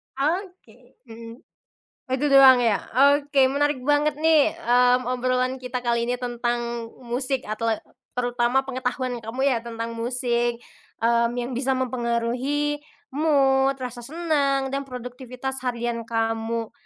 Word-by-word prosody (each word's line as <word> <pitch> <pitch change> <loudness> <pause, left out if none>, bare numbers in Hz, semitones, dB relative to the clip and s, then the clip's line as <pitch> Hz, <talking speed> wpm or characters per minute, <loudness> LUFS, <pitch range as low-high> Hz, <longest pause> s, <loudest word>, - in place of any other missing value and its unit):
Oke, 285 - -4
mhm. 230 0 -9 0.7
Oh 255 - -3
itu 280 - -1
doang 270 -1 +9
ya? 220 -4 +2 0.4
Oke 275 -2 +2
menarik 290 -2 0
banget 290 +1 +2
nih, 315 -1 +3
mmm, 250 +1 +3
obrolan 255 +1 0
kita 250 0 -4
kali 235 -1 +1
ini 245 - 0
tentang 240 -1 -3 0.2
musik, 255 +2 -2
atle 220 +1 -1 0.3
terutama 245 +1 +1
pengetahuan 255 -1 -3
kamu 225 +4 -5
ya 270 -3 +3
tentang 230 0 -5
musik, 240 0 0 0.5
mmm, 235 0 +3
yang 245 +1 -3
bisa 260 +2 0
mempengaruhi 255 +4 -1 0.3
mood, 275 -2 +3
rasa 250 -2 -6
senang, 280 -1 0
dan 275 0 -3
produktivitas 250 +1 -6
harian 235 -2 -3
kamu. 225 0 -2
250 Hz, 125 wpm, -24 LUFS, 235-270 Hz, 0.7 s, doang